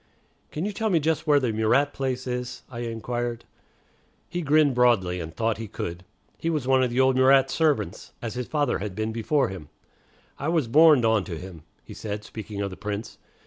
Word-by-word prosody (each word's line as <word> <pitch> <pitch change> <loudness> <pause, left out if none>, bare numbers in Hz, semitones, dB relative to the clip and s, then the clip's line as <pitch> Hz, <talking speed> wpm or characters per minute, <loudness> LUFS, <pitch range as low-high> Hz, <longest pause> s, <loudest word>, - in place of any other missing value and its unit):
"Can 155 +5 -4
you 210 - -1
tell 220 +2 -1
me 175 -5 +3
just 160 +1 -1
where 145 -1 +5
the 125 -5 -1
Murat 110 +7 +2
place 130 -2 -3
is?" 125 0 -4
I 120 - -6
inquired. 120 0 -3 0.8
He 175 +1 -3
grinned 150 -2 +4
broadly, 115 -8 +3
and 80 -1 -6
thought 115 +5 -1
he 115 - -5
could. 85 -2 -6 0.4
He 165 - -1
was 150 -6 -1
one 130 0 +4
of 130 - +2
the 120 +2 -1
old 130 0 +4
Murat 130 +1 +5
servants, 140 - 0
as 115 -3 -5
his 125 0 -4
father 145 -5 0
had 100 -1 -5
been 110 +1 -2
before 125 +6 +1
him. 90 -6 -9 0.7
"I 140 - -3
was 160 -6 +1
borned 150 -1 +6
on 110 -3 +3
to 85 - -5
him," 90 -2 -9 0.2
he - - -11
said, 105 -1 -5
speaking 105 -1 -7
of 100 -1 -2
the 95 - -9
Prince. 105 +1 -5
120 Hz, 205 wpm, -25 LUFS, 105-145 Hz, 0.8 s, borned